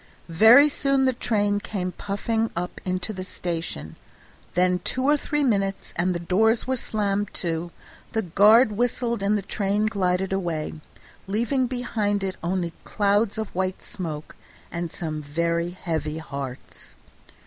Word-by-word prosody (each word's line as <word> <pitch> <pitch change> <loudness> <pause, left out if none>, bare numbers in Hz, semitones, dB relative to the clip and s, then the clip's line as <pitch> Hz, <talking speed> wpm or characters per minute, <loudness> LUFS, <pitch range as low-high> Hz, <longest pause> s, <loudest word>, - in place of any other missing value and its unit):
Very 225 - +8
soon 275 -2 +1
the 260 - +3
train 205 -4 +1
came 190 -3 -3
puffing 220 +4 -1
up 180 +1 -4
into 185 +3 -2
the 185 -2 -5
station; 165 - -4 0.6
then 180 0 +3
two 255 +8 -1
or 290 +2 +5
three 295 0 -1
minutes, 195 -6 0
and 180 +1 +1
the - - -1
doors 220 +7 +2
were 260 - 0
slammed 205 -4 -1
to, 170 -1 -2 0.4
the 220 - 0
guard 210 +7 +6
whistled, 235 0 0
and 205 +2 +2
the 200 - -4
train 200 +2 0
glided 190 -3 0
away, 170 -5 -2 0.5
leaving 240 +6 +1
behind 220 -5 -1
it 190 -1 -2
only 175 0 -1
clouds 205 +1 +1
of 220 -2 -4
white 185 0 -2
smoke 155 -5 -6 0.4
and 170 -1 -3
some 155 -3 -4
very 170 +3 -1
heavy 160 -4 -3
hearts. 135 - -8
195 Hz, 145 wpm, -25 LUFS, 170-220 Hz, 0.6 s, Very